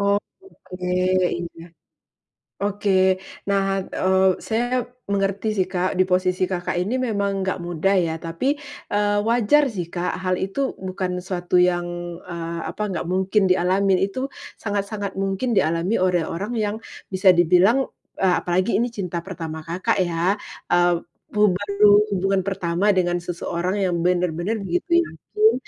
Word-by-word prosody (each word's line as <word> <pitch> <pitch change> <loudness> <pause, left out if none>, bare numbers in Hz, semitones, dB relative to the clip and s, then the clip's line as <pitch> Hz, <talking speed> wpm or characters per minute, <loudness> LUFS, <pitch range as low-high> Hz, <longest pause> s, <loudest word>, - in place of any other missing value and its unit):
Oh, 200 0 +3 0.2
oke, 295 - -13 0.5
iya. 170 -1 -6 0.9
Oke. 195 -2 +2 0.2
Nah, 195 -1 0
eee, 190 0 +2
saya 245 +3 0 0.3
mengerti 200 +2 0
sih 185 -3 0
Kak 185 0 0
di - - +7
posisi 185 0 +1
Kakak 180 -1 -2
ini 220 +8 -1
memang 200 -6 -1
gak 190 - -1
mudah 175 +3 0
ya 165 -2 0
tapi, 170 - -1 0.3
eee, 205 -1 +2
wajar 240 +6 +3
sih 185 -7 -4
Kak 175 0 -1
hal 185 0 +1
itu 225 +8 -1
bukan 185 -1 -3
suatu 180 -1 -3
yang, 175 -1 +2 0.4
eee, 170 -1 -5
apa - - -7
gak 175 -2 -3
mungkin 190 +3 +1
dialami 185 +1 +2
itu 260 +6 -4 0.3
sangat-sangat 200 -1 -3
mungkin 195 +6 -1
dialami 175 +2 +1
oleh 180 -3 +2
orang 200 +8 -4
yang 210 -1 0 0.4
bisa 185 0 +4
dibilang, 185 +10 +4 0.3
eee, 185 -2 +3
apalagi 185 +5 0
ini 240 - +1
cinta 180 -7 -4
pertama 165 -4 -6
Kakak 170 +4 -1
ya, 175 +2 +1 0.4
eee, 175 0 +4 0.3
bu 210 -2 +3
baru 205 +2 +4 0.2
hubungan 195 +1 +1
pertama 185 0 0
dengan 175 -1 +1
seseorang 175 +1 -3
yang 175 -2 0
bener-bener 180 +3 0
begitu 345 - +2
yakin, 430 +5 +1
190 Hz, 140 wpm, -22 LUFS, 175-205 Hz, 0.9 s, di